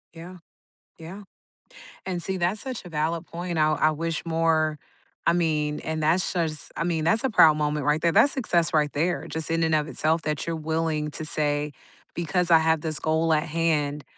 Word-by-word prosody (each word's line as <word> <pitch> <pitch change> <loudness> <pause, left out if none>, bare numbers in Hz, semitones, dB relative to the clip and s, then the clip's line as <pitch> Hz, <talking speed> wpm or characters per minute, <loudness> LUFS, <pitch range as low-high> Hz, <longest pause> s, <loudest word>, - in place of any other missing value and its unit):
Yeah. 175 +2 -10 0.6
Yeah. 175 +5 -9 0.8
And 180 -2 -3
see, 190 +2 -2
that's 185 +4 0
such 255 -6 -5
a - - -9
valid 160 +1 -2
point, 175 +2 -6
and 170 - -2
I 155 0 +3
I 155 +1 +2
wish 165 +1 -3
more 160 -2 +1 0.5
I - - +5
mean, 155 -3 0
and 160 0 -4
that's 165 +4 +1
just 160 -4 -2
I - - -2
mean, 165 -2 -1
that's 210 +9 +2
a 265 - +1
proud 155 -7 +6
moment 150 -1 -1
right 150 +1 +2
there; 170 0 +2
that's 225 - +5
success 175 -10 +1
right 150 -2 +1
there, 170 +5 -1
just 160 0 -3
in 165 0 0
and 160 -1 +2
of 150 0 0
itself 160 +2 0
that 150 -2 -3
you're 165 -1 -2
willing 160 -1 -2
to 155 - -4
say, 150 -1 0 0.4
"Because 175 +1 -1
I 165 - +8
have 160 0 +1
this 155 -1 -2
goal 160 +1 +1
at 155 0 +2
hand, 150 -3 -1
160 Hz, 205 wpm, -25 LUFS, 155-170 Hz, 0.8 s, I